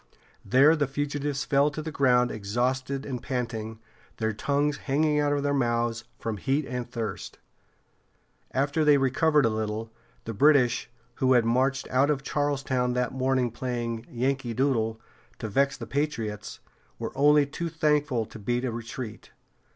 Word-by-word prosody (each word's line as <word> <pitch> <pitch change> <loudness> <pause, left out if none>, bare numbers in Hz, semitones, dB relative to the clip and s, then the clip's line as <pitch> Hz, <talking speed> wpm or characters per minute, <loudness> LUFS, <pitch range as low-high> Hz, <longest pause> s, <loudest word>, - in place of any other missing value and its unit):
There 140 +6 +5
the 145 -3 0
fugitives 145 0 -2
fell 140 +1 +3
to 150 - -7
the 160 +1 -4
ground 125 -3 +3
exhausted 130 +6 -2
and 125 -3 -4
panting, 115 -4 -3 0.4
their 110 -1 -1
tongues 145 +6 0
hanging 150 +2 +1
out 145 0 +2
of 145 -1 0
their 145 0 +1
mouths 120 -3 0
from 115 -2 -4
heat 135 +7 0
and 125 -2 -4
thirst. 110 -5 -5 1.1
After 140 +4 0
they 150 -1 +6
recovered 140 +2 +3
a - - +3
little, 110 +1 -3 0.3
the 115 - -4
British, 125 -1 +3 0.3
who 130 0 +3
had 120 -2 +4
marched 130 +3 +1
out 135 +3 +3
of 140 -2 0
Charlestown 135 -4 0
that 125 -1 -1
morning 130 -2 +1
playing 120 -1 -4
"Yankee 130 -1 -1
Doodle" 115 -4 +1 0.4
to 110 - -5
vex 135 +6 +1
the - - -6
patriots, 115 -8 -3 0.4
were - - -4
only 145 +1 +5
too 170 +4 -4
thankful 150 -7 +1
to 110 - -11
beat 120 +4 -1
a 125 - -1
retreat. 115 0 -7
130 Hz, 155 wpm, -27 LUFS, 115-145 Hz, 1.1 s, they